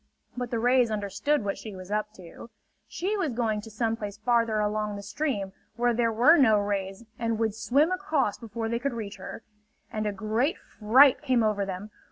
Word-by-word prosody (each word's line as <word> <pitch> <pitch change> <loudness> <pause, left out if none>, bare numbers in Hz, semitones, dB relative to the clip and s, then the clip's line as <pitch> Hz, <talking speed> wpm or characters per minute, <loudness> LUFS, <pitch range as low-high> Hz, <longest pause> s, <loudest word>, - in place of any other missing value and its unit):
But 245 -1 -4
the 235 - -1
rays 245 +1 +3
understood 215 +6 -1
what 200 - -2
she 215 -3 -8
was 185 +1 -10
up 210 0 -1
to. 180 +5 -12 0.4
She 390 +5 -2
was 335 - -1
going 225 -3 -1
to 225 - -11
some 225 +1 -1
place 205 -3 -6
farther 230 -1 +1
along 210 0 -1
the 200 - -7
stream 200 -5 -3 0.2
where 240 0 +2
there 230 0 +1
were 250 +10 +6
no 220 -6 +5
rays 200 +1 -3
and 230 -1 -1
would 220 -2 0
swim 280 - +2
across 320 - 0
before 230 0 -5
they 235 +1 -1
could 275 +1 -2
reach 205 -3 -6
her. - - -8 0.5
And 215 0 -1
a - - 0
great 220 - -1
fright 255 +6 +4
came 255 -5 +2
over 205 -2 0
them. 195 +3 -6
225 Hz, 200 wpm, -27 LUFS, 210-245 Hz, 0.5 s, were